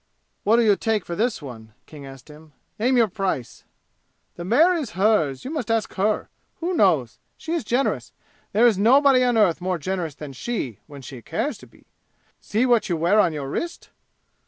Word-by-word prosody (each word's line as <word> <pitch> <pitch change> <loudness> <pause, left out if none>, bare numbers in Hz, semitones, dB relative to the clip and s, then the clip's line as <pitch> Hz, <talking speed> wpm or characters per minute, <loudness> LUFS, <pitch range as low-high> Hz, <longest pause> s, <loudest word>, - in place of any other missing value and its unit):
"What'll 230 +2 +4
you 205 -2 +5
take 220 -1 -1
for 170 - -5
this 220 -4 -1
one?" 110 -5 -10
King 145 -3 -11
asked 135 -1 -13
him. 150 0 -15 0.3
"Name 250 +3 +2
your 230 -2 +4
price!" 185 - -4 0.7
"The 175 - -7
mare 295 - +4
is 290 - -4
hers. 190 -10 +1
You 270 - -5
must 295 -9 -4
ask 225 -1 0
her. 210 +2 0 0.3
Who 345 +2 -2
knows? 160 - +2 0.2
She 325 - -5
is 340 - -1
generous. 245 +5 -1 0.4
There 225 +4 +4
is 220 -5 +4
nobody 260 +4 +5
on 245 -2 +2
earth 185 -5 +3
more 185 0 -1
generous 170 -2 -4
than 145 -3 -9
she 135 - -4
when 140 -3 -11
she 125 0 -9
cares 220 - -3
to - - -14
be. - - -24 0.5
See 220 +4 0
what 240 -4 +2
you 170 - 0
wear 175 +7 +3
on 180 -5 +4
your 145 -3 -5
wrist!" 335 - -5
205 Hz, 190 wpm, -23 LUFS, 155-240 Hz, 0.7 s, you